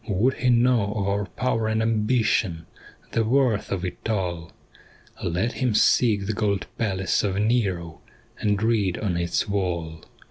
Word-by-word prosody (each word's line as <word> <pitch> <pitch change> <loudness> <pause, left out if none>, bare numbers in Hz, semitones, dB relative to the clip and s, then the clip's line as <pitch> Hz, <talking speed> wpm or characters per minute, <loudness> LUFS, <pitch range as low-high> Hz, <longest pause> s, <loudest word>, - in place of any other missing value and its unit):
* - - -24
Would 110 +6 +2
he 125 - +1
know 120 -4 +3
of 100 -2 -1
our 100 +1 0
power 115 0 -1
and 110 0 0
ambition, 110 -6 +1 0.5
The 115 - +1
worth 120 -2 +1
of 95 -1 -2
it 90 +4 -6
all? 90 -6 -2 0.7
Let 90 +8 0
him 125 -5 -1
seek 105 -3 +3
the 110 - -1
gold 100 -3 -1
palace 95 -4 0
of 100 -2 0
Nero, 100 -7 0 0.4
And 105 0 0
read 105 -6 +1
on 100 -5 -1
its 85 +4 -1
wall. 85 -5 -2
105 Hz, 155 wpm, -24 LUFS, 95-115 Hz, 0.7 s, know